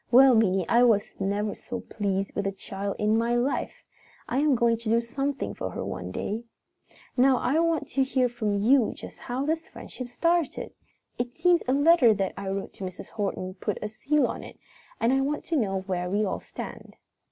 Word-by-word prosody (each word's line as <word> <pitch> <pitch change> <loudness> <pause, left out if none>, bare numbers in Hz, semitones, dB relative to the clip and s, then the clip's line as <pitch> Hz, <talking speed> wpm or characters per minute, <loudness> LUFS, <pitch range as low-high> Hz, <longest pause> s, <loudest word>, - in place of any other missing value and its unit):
Well, 260 +2 +8
Minnie, 195 -5 +3
I 235 - +4
was 225 -5 +3
never 205 +2 -1
so 240 -1 -6
pleased 195 -3 -2
with 200 -1 -1
a - - 0
child 195 0 -5
in 215 +1 +2
my 235 +1 +1
life! 245 +4 -1 0.4
I 255 - 0
am 295 -2 +4
going 235 -1 +3
to 225 -1 -5
do 230 +1 +4
something 275 +4 -3
for - - -4
her - - -5
some - - -5
day. 220 +3 -3 0.7
"Now 260 0 +5
I 270 +7 +1
want 330 -1 +1
to 270 - +2
hear 260 -1 +2
from 220 -4 -1
you 240 +4 +4
just - - -10
how 255 +3 -3
this 320 +2 -1
friendship 255 - -8
started. 335 +6 0 0.5
It 245 +1 -3
seems 355 -1 +4
a 255 - +3
letter 285 -5 +6
that 195 -2 -1
I 200 -1 -5
wrote 195 0 -4
to - - -9
Mrs. 185 -1 -7
Horton 195 -3 -3
put 200 +2 -3
the 210 - -3
seal 290 +7 +1
on - - -3
it - - -11 0.4
and 235 +3 +3
I 270 - +3
want 290 +2 -2
to 335 - -1
know 195 -8 0
where 180 -2 -2
we 205 +3 +1
all 190 - -2
stand." - - -9
235 Hz, 205 wpm, -27 LUFS, 200-270 Hz, 0.7 s, Well